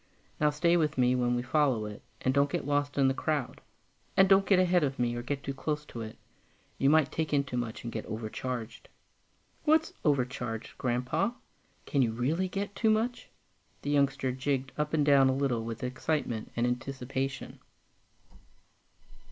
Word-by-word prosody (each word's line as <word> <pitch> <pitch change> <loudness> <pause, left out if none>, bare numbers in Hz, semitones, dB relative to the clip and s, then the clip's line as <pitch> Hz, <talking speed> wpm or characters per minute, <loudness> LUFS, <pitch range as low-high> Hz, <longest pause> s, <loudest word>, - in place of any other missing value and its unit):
Now 150 - +4
stay 170 +4 +3
with 155 -3 0
me 125 0 +4
when 125 -1 +1
we 120 - -1
follow 130 -4 +2
it, 105 -1 -8 0.2
and 130 - +1
don't 140 +1 +3
get - - -2
lost 145 0 0
in 135 -1 +5
the 135 - +3
crowd; 145 -1 -2 0.6
and 190 - +7
don't 195 0 +5
get 195 - +5
ahead 180 -2 +4
of 135 -2 -1
me 120 -1 0
or 120 - -3
get 140 +3 -4
too 140 - -3
close 150 +2 -3
to 120 - -7
it 110 0 -7 0.6
you 135 - +4
might 155 -2 +4
take 155 -2 -1
in 140 - +3
too 140 -3 -6
much, 120 -2 -3
and 115 - -5
get 110 - -4
overcharged." 115 +2 -5 0.7
"What's 320 +1 +3
'overcharged,' 125 -6 -1
Grandpa? 125 - 0 0.5
Can 140 - +1
you 115 -3 +2
really 155 +11 0
get 200 +2 -3
too 220 - +2
much?" 225 +3 0 0.5
The 145 - -1
youngster 140 -2 +2
jigged 130 0 -1
up 150 +1 -1
and 150 -2 +2
down 140 -2 +6
a 130 - +1
little 130 -5 0
with 115 +2 -5
excitement 125 -2 -2
and 120 - +1
anticipation. 130 +2 -3
135 Hz, 175 wpm, -30 LUFS, 125-150 Hz, 0.7 s, and